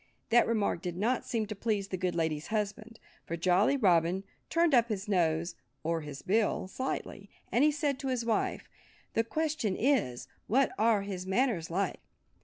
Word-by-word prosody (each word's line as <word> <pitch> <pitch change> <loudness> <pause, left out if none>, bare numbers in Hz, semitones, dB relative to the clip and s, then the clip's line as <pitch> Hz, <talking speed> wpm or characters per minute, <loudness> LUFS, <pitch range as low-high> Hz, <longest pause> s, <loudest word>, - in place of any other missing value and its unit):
That 240 +1 +5
remark 210 -6 0
did 175 -2 -4
not 235 +6 0
seem 225 -2 0
to 215 +1 -6
please 200 -2 -1
the - - -2
good 180 -1 -1
lady's 160 -2 -1
husband. 215 +1 -3 0.3
For 170 - -3
Jolly 185 +10 +3
Robin 180 -4 +3 0.3
turned 335 -2 +3
up 235 -2 +5
his 205 -1 -3
nose—or 165 - -1
his 145 -2 -8
bill—slightly, 215 +4 -1 0.2
and 245 - +3
he 305 - +5
said 290 -2 -1
to 270 - -4
his 250 -3 -1
wife, 225 -2 0 0.5
"The 225 - +2
question 290 -5 -1
is: 225 - +1 0.2
What 265 +4 +3
are 220 -2 +3
his 190 -2 -5
manners 195 -5 +1
like?" 190 +4 -1
205 Hz, 165 wpm, -31 LUFS, 175-235 Hz, 0.5 s, That